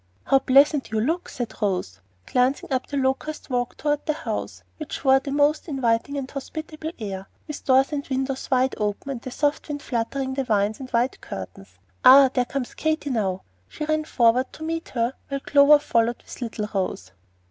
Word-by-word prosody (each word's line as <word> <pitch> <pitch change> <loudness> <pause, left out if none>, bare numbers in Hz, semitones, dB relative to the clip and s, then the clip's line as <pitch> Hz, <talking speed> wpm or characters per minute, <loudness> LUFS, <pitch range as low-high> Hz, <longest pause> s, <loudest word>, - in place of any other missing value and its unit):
"How 270 - +4
pleasant 275 +2 +4
you 220 - -1
look!" 320 +10 -1
said 240 -3 -5
Rose, 180 - -1 0.3
glancing 255 +3 0
up 255 - -1
the 285 - -3
locust 270 +2 -2
walk 245 -1 -1
toward 295 -1 -1
the 305 - +2
house, 320 +2 -5
which 305 -2 -7
wore 265 0 +6
a - - -5
most 290 +3 +2
inviting 265 -1 0
and 270 -1 -5
hospitable 310 +3 -6
air, 195 -3 -6 0.2
with 300 - -7
doors 265 +2 +4
and 280 -1 -3
windows 265 0 -2
wide 260 0 +2
open, 210 +6 -2
and 250 -4 -5
the 255 - -6
soft 290 +3 -1
wind 290 -1 -4
fluttering 260 +3 -2
the 270 0 -1
vines 210 -3 0
and 260 -1 -8
the - - -27
white 240 +2 +1
curtains. 95 -1 -9 0.3
"Ah, 270 0 +9
there 250 -1 +2
comes 260 -1 -4
Katy 315 -2 -1
now." 195 -6 -1 0.2
She 300 - -5
ran 310 0 0
forward 245 -1 +2
to 315 - -9
meet 330 +1 -3
her 235 0 -1
while 275 0 -3
Clover 285 +2 +6
followed 235 -4 0
with - - -11
little 220 -3 -3
Rose. 185 - -2
265 Hz, 190 wpm, -24 LUFS, 230-285 Hz, 0.3 s, Ah